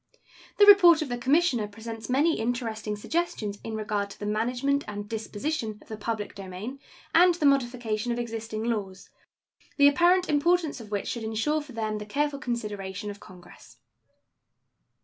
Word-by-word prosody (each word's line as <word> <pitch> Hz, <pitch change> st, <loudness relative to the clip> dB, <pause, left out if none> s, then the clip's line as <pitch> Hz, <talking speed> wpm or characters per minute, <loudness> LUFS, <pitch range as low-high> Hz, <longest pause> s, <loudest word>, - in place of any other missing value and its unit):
The 410 Hz, -, +7 dB
report 350 Hz, -6 st, +8 dB
of 285 Hz, -, -7 dB
the 245 Hz, -, -2 dB
Commissioner 260 Hz, -4 st, +2 dB
presents 225 Hz, +2 st, -8 dB
many 295 Hz, +6 st, +2 dB
interesting 225 Hz, -2 st, -2 dB
suggestions 210 Hz, -5 st, -2 dB
in 225 Hz, -, -5 dB
regard 210 Hz, -2 st, -2 dB
to -, -, -11 dB
the 205 Hz, -, -5 dB
management 250 Hz, +7 st, 0 dB
and 205 Hz, 0 st, -6 dB
disposition 220 Hz, +2 st, -3 dB
of -, -, -21 dB
the 220 Hz, -, -5 dB
public 215 Hz, 0 st, -4 dB
domain 200 Hz, +7 st, -7 dB, 0.3 s
and 350 Hz, +1 st, +6 dB
the 315 Hz, -, -1 dB
modification 240 Hz, -5 st, +1 dB
of 235 Hz, -, -1 dB
existing 225 Hz, -2 st, -4 dB
laws, 205 Hz, -5 st, -4 dB, 0.7 s
the 285 Hz, -1 st, +7 dB
apparent 350 Hz, +5 st, +4 dB
importance 315 Hz, -1 st, +1 dB
of 215 Hz, -, -11 dB
which 205 Hz, -1 st, -3 dB
should 235 Hz, -, -4 dB
insure 225 Hz, +8 st, 0 dB
for 290 Hz, -3 st, -12 dB
them 215 Hz, -2 st, -2 dB
the 210 Hz, -, -8 dB
careful 290 Hz, +4 st, -1 dB
consideration 210 Hz, -5 st, -4 dB
of 200 Hz, -, -11 dB
Congress. 180 Hz, -2 st, -15 dB
230 Hz, 160 wpm, -27 LUFS, 210-285 Hz, 0.7 s, report